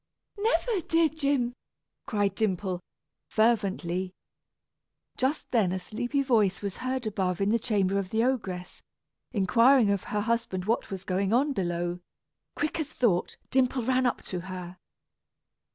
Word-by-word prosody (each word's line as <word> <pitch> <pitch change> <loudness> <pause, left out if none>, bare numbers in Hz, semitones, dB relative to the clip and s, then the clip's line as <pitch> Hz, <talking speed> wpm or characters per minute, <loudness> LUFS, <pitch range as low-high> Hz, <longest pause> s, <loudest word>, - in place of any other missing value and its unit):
"Never, 425 +1 +1
dear 330 0 +3
Jim," 280 -5 0 0.5
cried 205 -2 +1
Dimple, 190 -3 -1 0.5
fervently. 190 -5 +1 1.0
Just 265 +4 -1
then 215 -7 +3
a 190 - -1
sleepy 240 +9 -2
voice 210 -7 +2
was 200 -1 -3
heard 255 -1 -2
above 190 -4 -1
in 200 0 +2
the 230 +2 +3
chamber 200 -4 +1
of 190 -2 -4
the 220 +2 +1
ogress, 190 -8 -2 0.5
inquiring 230 +2 +5
of 200 -2 -1
her 210 - -1
husband 225 -5 -1
what 225 +3 0
was 190 -2 -5
going 195 +2 0
on 280 +4 +3
below. 175 -3 -2 0.6
Quick 300 +2 -1
as 310 -1 -3
thought, 200 - +1
Dimple 255 -1 +2
ran 255 +1 +2
up - - -2
to 180 - -4
her. 180 0 -7
215 Hz, 140 wpm, -28 LUFS, 185-255 Hz, 1.0 s, inquiring